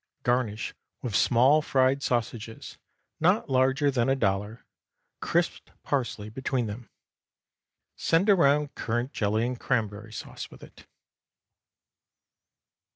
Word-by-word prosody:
Garnish 120 -3 0 0.3
with 120 -5 -3
small 130 +6 +5
fried 135 -1 +2
sausages, 115 -3 -3 0.4
not 180 -1 +2
larger 130 +3 +3
than 125 -2 +1
a 135 - +3
dollar, 105 -1 -1 0.5
crisped - - -1
parsley 120 -6 -2
between 130 +2 -2
them. 110 +3 -7 1.1
Send 165 +5 +2
around 150 -7 +4
currant 120 +4 -2
jelly 110 +2 +1
and 125 0 -3
cranberry 110 -3 -2
sauce - - -7
with - - -15
it. - - -15
125 Hz, 105 wpm, -27 LUFS, 110-140 Hz, 1.1 s, small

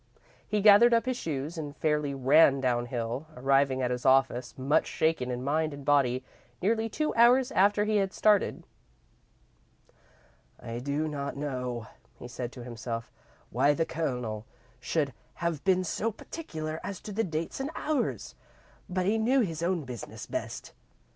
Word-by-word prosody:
He 210 -1 0
gathered 220 +4 +7
up 230 - +1
his 255 0 -1
shoes 155 - -4
and 145 -1 -6
fairly 150 -2 0
ran 135 +1 +5
downhill, 120 +1 -2
arriving 135 0 +2
at 125 - 0
his 125 0 -3
office 130 -2 +2
much 135 +3 +2
shaken 155 -6 0
in 125 0 -3
mind 155 +2 0
and 140 -1 -11
body, 130 -3 +2 0.4
nearly 225 +3 +1
two 305 +8 -1
hours 245 +2 +5
after 205 +2 +3
he 215 0 +2
had 195 -1 +1
started. 210 -1 +2 2.0
"I 115 +1 -6
do 145 +4 -1
not 140 -2 -4
know," 125 -5 -3 0.3
he 120 - -9
said 120 0 -5
to 125 - -9
himself, 115 -1 -5 0.4
"why 140 +5 +3
the 165 - +1
Colonel 125 -10 -3 0.3
should 145 -5 -1 0.2
have 170 -3 -2
been 185 -1 +3
so 220 +5 -1
particular 160 - -6
as 200 -2 -5
to 210 - -8
dates 170 -5 -2
and 270 +2 -2
hours, 300 -3 -2 0.6
but 185 0 -1
he 215 +3 +2
knew 255 +4 +3
his 165 -7 -2
own 175 -1 0
business 125 -5 -8
best." - - -5
150 Hz, 155 wpm, -29 LUFS, 130-195 Hz, 2.0 s, gathered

